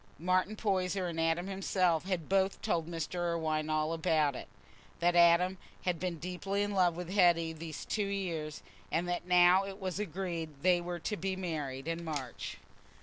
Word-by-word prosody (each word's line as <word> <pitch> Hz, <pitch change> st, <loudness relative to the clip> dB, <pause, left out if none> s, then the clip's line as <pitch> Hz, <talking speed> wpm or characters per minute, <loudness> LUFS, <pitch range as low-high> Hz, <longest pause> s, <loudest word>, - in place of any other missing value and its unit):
Martin 185 Hz, +5 st, +1 dB
Poyser 190 Hz, -3 st, 0 dB
and 170 Hz, -2 st, -3 dB
Adam 165 Hz, +2 st, +1 dB
himself 185 Hz, -3 st, +1 dB
had 185 Hz, -5 st, -2 dB
both 195 Hz, 0 st, +2 dB
told 165 Hz, -2 st, 0 dB
Mr. 165 Hz, +1 st, -3 dB
Irwine 160 Hz, -3 st, -1 dB
all 155 Hz, +1 st, +1 dB
about 160 Hz, -4 st, +2 dB
it—that 175 Hz, +6 st, -4 dB
Adam 175 Hz, +2 st, +5 dB, 0.2 s
had 180 Hz, -3 st, 0 dB
been 180 Hz, -2 st, -2 dB
deeply 185 Hz, +4 st, -2 dB
in 205 Hz, -, -2 dB
love 180 Hz, -4 st, +3 dB
with 175 Hz, 0 st, -6 dB
Hetty 170 Hz, -4 st, +4 dB
these 160 Hz, -1 st, -7 dB
two 210 Hz, -2 st, -1 dB
years, 170 Hz, -7 st, -3 dB, 0.3 s
and 170 Hz, +2 st, 0 dB
that 175 Hz, 0 st, -2 dB
now 180 Hz, +1 st, +6 dB
it 195 Hz, 0 st, -7 dB
was 190 Hz, -1 st, -3 dB
agreed 170 Hz, -6 st, -4 dB
they 180 Hz, -1 st, +4 dB
were 175 Hz, 0 st, -4 dB
to 210 Hz, +4 st, -2 dB
be 190 Hz, +2 st, -2 dB
married 150 Hz, -7 st, -4 dB
in 165 Hz, +1 st, -2 dB
March. 145 Hz, -6 st, -5 dB
175 Hz, 170 wpm, -32 LUFS, 165-185 Hz, 0.3 s, now